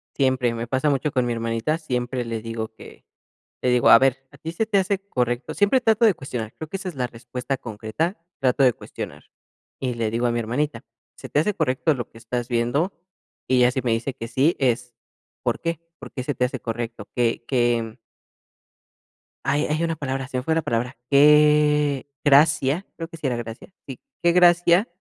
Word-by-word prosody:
Siempre, 130 -3 +2
y - - -3
me 115 0 -4
pasa 130 +5 +1
mucho 145 +1 0
con 125 -2 +1
mi 120 - -1
hermanita. 115 +6 -1
Siempre 125 -5 -3
le 115 -1 -4
digo 115 0 -5
que - - -14 0.6
le 125 - +1
digo: 125 -1 +4
"A 115 - +10
ver, 135 0 +1
¿a 145 - -16
ti 160 +3 -6
se 195 +7 -1
te 215 -2 +1
hace 195 0 +1
correcto?". 120 -3 -1
Siempre 205 +6 +3
trato 225 -1 +3
de 215 - +5
cuestionar, 120 -7 -6
creo 160 - -6
que 195 - -3
esa 190 -1 -5
es 175 - -10
la 125 -2 -1
respuesta 125 +3 -5
concreta, 110 - -3 0.2
trato 135 0 +2
de 125 -2 +5
cuestionar - - -8 0.6
y 130 -2 -1
le 115 -2 -1
digo 115 +2 0
a - - +1
mi 120 - -1
hermanita: 125 +3 -2 0.3
"¿Se - - -10
te - - +2
hace 205 +7 +1
correcto 130 +5 +1
lo 125 -4 -5
que - - -16
estás 120 +1 -4
viendo?". 125 +9 0 0.5
Y 130 - +3
ella, 125 0 +5
si 130 - -2
me 120 -1 0
dice 115 +4 -1
que 115 - -7
sí, 135 +8 +2
es, 125 -2 0 0.5
¿por - - 0
qué? 165 -2 -2 0.2
¿Por - - -10
qué 130 - -5
se 145 +1 -3
te 125 - +2
hace 130 +1 -4
correcto? 115 -2 -5
¿Qué 120 -1 +1
qué? 120 -3 0 1.5
Hay 145 +2 +1
hay 155 +2 -1
una 165 -1 0
palabra, 135 -3 -3
se 130 - -4
me 125 - -2
fue 160 +3 +1
la 165 - +2
palabra, 125 -3 -2
¿qué 150 -1 +5 0.2
gracia? 150 +3 +4
Creo 165 - -5
que 165 - -11
sí 155 - -2
era 125 -2 -1
gracia, 115 +4 -7 0.2
sí, 135 -3 -7 0.2
¿qué 170 - +5
gracia 175 +3 +5
130 Hz, 210 wpm, -23 LUFS, 120-150 Hz, 1.5 s, A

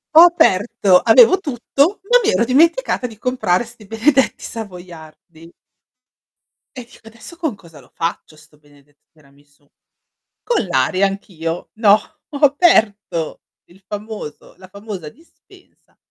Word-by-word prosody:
Ho 325 - +10
aperto 205 - +4
avevo 445 - +5
tutto, 285 - -1
ma - - +6
mi 430 - +2
ero 235 - +1
dimenticata 320 - +1
di 225 -3 -14
comprare 240 -6 -1
sti 230 -2 -16
benedetti 255 +6 0
savoiardi. 170 -5 -11 1.2
E 250 - -8
dico: 230 -1 -20
"Adesso 230 +9 -13
con 315 - -3
cosa 170 -5 -17
lo - - -20
faccio 165 -1 -5
sto 155 0 -21
benedetto 145 -1 -27
tiramisù?" 145 -1 -27 0.8
Con 475 - -1
l'aria, 180 +5 +1
anch'io. 175 -4 -6
No, 215 -2 +4 0.3
ho 285 - -7
aperto 220 - +1 0.3
il 180 +3 -22
famoso 210 -6 -9
la 185 0 -15
famosa 200 -4 -9
dispensa 325 - -23
205 Hz, 125 wpm, -18 LUFS, 165-255 Hz, 1.2 s, Ho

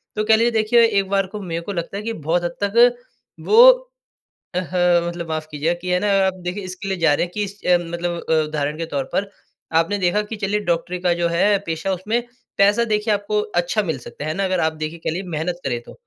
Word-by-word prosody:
तो 215 - 0
कह 220 0 +6
लीजिए 235 +2 +2
देखिए 225 +1 +4
एक 200 -3 +1
बार 195 -1 +1
को 210 +2 -7
मेरे 170 -2 -4
को 200 +4 -5
लगता 170 +3 -4
है 210 - -5
कि 230 0 -3
बहुत 165 +2 -1
हद 175 0 -3
तक 235 +4 +5 0.5
वो 470 +4 +8 0.9
अ, - - +1
ह 175 -1 +3
मतलब 170 -1 -6
माफ 155 -1 -3
कीजिए 155 +4 -1
कि 180 - -5
है 180 - +3
ना 210 - 0 0.2
आप 190 - 0
देखिए 185 +3 -3
इसके 185 +2 -7
लिए 190 - -1
जा 165 -3 +4
रहे 170 - +1
हैं 175 - -10
कि 210 - -1
इस 200 +1 -9
अ, 180 -1 +5
मतलब 170 0 -3
अ, - - +3
उदाहरण 150 0 -3
के 165 - -3
तौर 140 -4 -2
पर, 195 0 -1 0.5
आपने 200 +5 +1
देखा 185 +3 +1
कि 225 - -4
चलिए 205 0 -1
डॉक्टरी 175 +2 -1
का 180 -1 +2
जो 170 0 0
है 200 +4 +3
पेशा 165 +4 -2
उसमें 210 +6 -1 0.4
पैसा 205 +4 +4
देखिए 210 -1 0
आपको 205 +1 -1 0.2
अच्छा 195 +5 -1
मिल 160 -8 -3
सकता 145 - -9
है, 155 - -2
है 160 - -3
ना? 195 - 0
अगर 185 -1 0
आप 160 0 +1
देखिए, 160 +2 -4
कह 160 - -3
लीजिए 180 +2 -5
मेहनत 170 +3 -3
करें 120 -3 -1
तो। - - -13
180 Hz, 250 wpm, -21 LUFS, 170-205 Hz, 0.9 s, वो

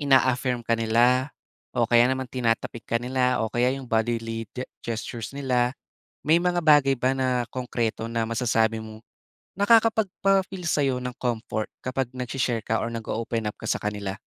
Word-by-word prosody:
ina-affirm 130 -3 +2
ka 115 - 0
nila 120 +4 +3 0.5
o - - +4
kaya 120 +1 +5
naman 130 0 -1
tinatapik 115 -2 -1
ka 115 - +2
nila 125 0 +1
o 110 - -5
kaya 120 +1 +2
'yong 135 - -7
bodily 115 -1 -1
ge 125 - -2 0.2
gestures 115 0 -5
nila, 125 -2 +1 0.5
may 155 +3 +4
mga 175 0 +1
bagay 145 -3 +5
ba 130 +1 +2
na 125 -2 0
konkreto 120 -2 -2
na 115 -1 -1
masasabi 115 -1 +1
mong, 110 0 -10 0.5
nakakapagpa-feel 200 -3 +2
sa'yo 140 -5 +2
ng 125 0 -4
comfort 115 -3 -2 0.2
kapag 130 -1 -1
nag-she-share 125 -2 -2
ka 115 0 0
or 115 - -2
nag-o-open 115 0 -3
up 105 - -3
ka - - -6
sa - - +2
kanila? 105 -1 -3
125 Hz, 160 wpm, -25 LUFS, 115-130 Hz, 0.5 s, kaya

